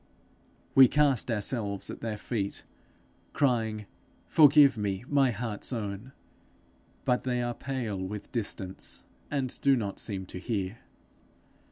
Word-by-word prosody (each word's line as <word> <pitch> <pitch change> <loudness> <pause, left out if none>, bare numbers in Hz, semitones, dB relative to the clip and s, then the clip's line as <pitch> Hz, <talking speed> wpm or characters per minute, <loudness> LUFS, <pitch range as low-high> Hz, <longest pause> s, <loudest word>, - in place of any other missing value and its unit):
We 135 -1 +9
cast 140 -5 +2
ourselves 105 -3 -1
at - - -9
their 110 -2 -3
feet, 105 -2 -3 0.7
crying, 110 -6 +1 0.4
Forgive 145 -3 +7
me, 100 0 -2
my 140 -2 +3
heart's 110 -1 -4
own! 105 +1 -4 0.9
but 125 - +2
they 125 -1 0
are 120 0 -1
pale 120 -7 -3
with 95 +2 -6
distance, 100 -5 -4 0.3
and 135 -4 -3
do 140 -1 +5
not 100 -5 -3
seem 95 -4 -4
to 90 - -8
hear. 100 +1 -3
115 Hz, 125 wpm, -29 LUFS, 100-130 Hz, 0.9 s, We